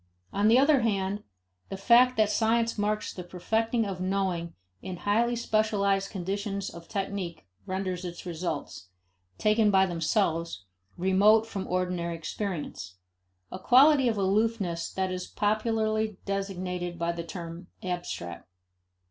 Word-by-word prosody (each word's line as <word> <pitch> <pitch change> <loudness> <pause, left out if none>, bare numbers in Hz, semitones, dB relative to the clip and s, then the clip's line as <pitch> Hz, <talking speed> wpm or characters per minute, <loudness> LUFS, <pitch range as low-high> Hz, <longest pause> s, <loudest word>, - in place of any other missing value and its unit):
On 205 +1 +2
the 230 +3 +6
other 280 +1 +5
hand, 200 -2 0 0.5
the 195 - -5
fact 240 +5 +5
that 215 -1 +3
science 230 +1 +2
marks 210 0 -1
the 180 - -7
perfecting 225 +6 0
of 190 -2 -4
knowing 185 -3 -1 0.3
in 185 -1 -6
highly 230 +6 +1
specialized 205 -4 +1
conditions 200 +1 -3
of 170 0 -11
technique 195 -5 -4 0.2
renders 185 -1 -3
its 175 0 -7
results, 170 - -4 0.5
taken 215 0 +3
by 190 -1 +5
themselves, 165 - -1 0.3
remote 200 +4 +4
from 195 -4 -5
ordinary 180 -2 -1
experience 165 - -5 0.6
a - - -6
quality 270 +5 +6
of 225 -3 +1
aloofness 195 -3 0
that 190 -1 -1
is 180 0 -4
popularly 215 0 0
designated 185 -3 -3
by 170 0 0
the 170 0 -5
term 170 +1 -8 0.2
abstract. 175 - -5
195 Hz, 130 wpm, -28 LUFS, 180-215 Hz, 0.6 s, the